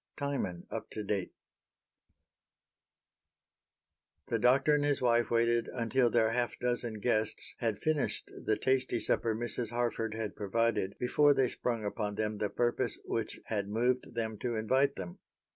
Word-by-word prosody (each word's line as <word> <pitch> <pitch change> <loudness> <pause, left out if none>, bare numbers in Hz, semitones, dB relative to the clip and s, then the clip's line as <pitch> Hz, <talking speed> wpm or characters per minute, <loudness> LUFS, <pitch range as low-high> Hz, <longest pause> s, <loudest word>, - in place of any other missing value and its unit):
Timon 140 - -2
Up - - -5
To 110 - -4
Date 100 -2 -2 3.0
The 115 - +1
Doctor 135 +6 +4
and 145 -1 +3
his 145 -1 +2
wife 120 -1 +3
waited 115 0 +2
until 120 +1 +1
their 115 -1 +3
half 120 -2 -1
dozen 120 -2 -1
guests 110 0 -1
had 115 -3 0
finished 155 -2 -1
the 110 - +1
tasty 130 0 +1
supper 115 -1 +1
Mrs. 120 0 -2
Harford 115 -2 -1
had 110 -2 -4
provided 105 -1 0
before 145 +3 +4
they 130 -2 +3
sprung 115 -3 -2
upon 105 0 -2
them 105 0 -2
the 105 - 0
purpose 120 +2 +1
which - - -3
had 100 -3 -2
moved 120 +3 0
them 110 -2 -2
to 120 -2 -2
invite 130 +6 +2
them. 90 -2 -7
115 Hz, 145 wpm, -32 LUFS, 110-125 Hz, 3.0 s, Doctor